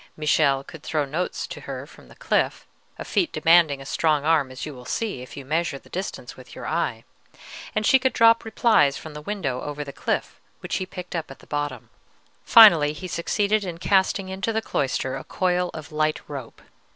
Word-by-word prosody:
Michele 140 -3 +2
could 160 +2 -12
throw 155 -1 -1
notes 160 +6 -3
to - - -9
her - - -6
from - - -17
the - - -16
cliff, - - 0 0.3
a - - -7
feat 340 - 0
demanding 160 -2 +4
a 135 - -10
strong 150 0 +1
arm, 155 -4 +3
as 130 -1 -7
you 150 - -7
will 125 -2 -11
see, 200 - -3
if 125 - -11
you 140 - -8
measure 155 0 -1
the - - -19
distance 185 +2 -5
with - - -14
your - - -8
eye, - - -2 0.7
and 215 0 0
she 265 -2 +6
could 260 0 +1
drop 230 0 +5
replies 220 - +3
from 155 +3 -9
the 150 - -8
window 150 -9 -3
over 150 0 -5
the 140 -1 -9
cliff, - - -3 0.2
which - - -2
he 185 - -4
picked 180 -1 -8
up 165 -2 -3
at 135 - -10
the - - -18
bottom. 145 -5 -4 0.5
Finally 170 -10 +8
he 185 +4 -7
succeeded 205 +5 0
in 175 -3 -5
casting 190 +1 +1
into 190 +4 -2
the 220 - 0
cloister 135 -9 -2
a 135 - -6
coil 180 +2 0
of 155 0 -8
light 155 0 0
rope. 135 -5 -8
155 Hz, 205 wpm, -24 LUFS, 145-190 Hz, 0.7 s, Finally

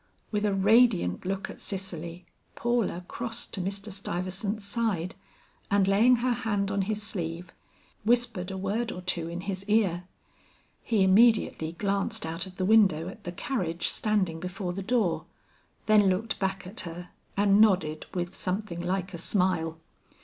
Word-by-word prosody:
With 210 -1 0
a 205 - +2
radiant 200 - +4
look 195 +1 -2
at - - -10
Cicely, 180 -3 -4 0.3
Paula 235 -7 0
crossed 235 0 -4
to 195 - -2
Mr. 195 +3 -3
Stuyvesant's 195 +2 -2
side, 200 -5 -1 0.6
and 200 -1 +3
laying 220 +6 +5
her 245 +1 +1
hand 205 -5 -1
on 200 0 +1
his 210 +2 -2
sleeve, 175 -4 -3 0.5
whispered 225 -5 +2
a 190 - -4
word 210 +5 -1
or 180 - -6
two 170 -2 -1
in 170 +1 -5
his 190 0 -4
ear. 190 -5 +2 0.8
He 215 -4 +2
immediately 190 -5 +4
glanced 200 +3 -1
out 165 +4 -2
of 185 - -12
the 185 - -1
window 190 -6 +4
at 205 +2 -12
the 175 - -3
carriage 175 -5 -1
standing 195 -7 0
before 180 0 -4
the 195 - -4
door, 210 -5 0 0.6
then 210 -2 +5
looked 220 +4 -1
back 190 -1 -2
at 195 +5 -7
her 175 +1 -6 0.3
and 200 0 +5
nodded 185 -8 +2
with 175 +1 -3
something 185 -2 -3
like 185 +1 -2
a 170 - -5
smile. 170 -3 0
195 Hz, 155 wpm, -28 LUFS, 180-215 Hz, 0.8 s, laying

